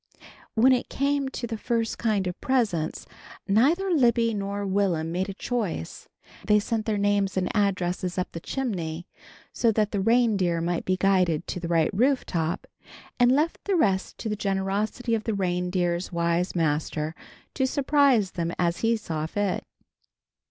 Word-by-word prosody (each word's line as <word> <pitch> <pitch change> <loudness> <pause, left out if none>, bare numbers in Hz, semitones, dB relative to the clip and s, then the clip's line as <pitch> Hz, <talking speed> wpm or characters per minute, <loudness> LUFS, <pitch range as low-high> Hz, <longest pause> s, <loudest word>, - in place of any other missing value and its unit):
When 240 +4 +5
it 250 - -1
came 280 0 0
to 250 - -5
the 225 -2 -5
first 230 -1 -1
kind 215 -4 +1
of 180 -1 -5
presents, 210 -12 0 0.4
neither 300 - +3
Libby 235 -6 +3
nor 200 0 -3
Will'm 190 -5 0
made 185 +3 -1
a - - -4
choice. 210 - -4 0.3
They 210 - +4
sent 220 +1 -2
their 215 -2 +1
names 200 -1 +1
and 185 +3 -1
addresses 185 -3 0
up 180 - -2
the 165 - -6
chimney 175 -9 -3 0.5
so 230 - +2
that 210 -1 +1
the 205 - -1
reindeer 205 -6 +2
might 170 +1 -2
be 185 0 +1
guided 180 -4 +2
to - - -4
the 170 - -4
right 165 -2 +2
roof 255 +6 +2
top, 165 -1 -2 0.5
and 245 0 +5
left 300 +5 +1
the 400 - +1
rest 195 - +1
to - - -5
the 210 - -1
generosity 200 +4 -1
of 220 -1 -1
the 225 - -1
reindeer's 180 -1 -1
wise 170 +1 0
master 155 -1 -1 0.4
to 265 -2 +1
surprise 275 -7 +3
them 170 -1 -2
as 175 -1 +1
he 230 0 +2
saw 160 -7 -4
fit. 205 +2 -1
200 Hz, 165 wpm, -26 LUFS, 175-230 Hz, 0.5 s, When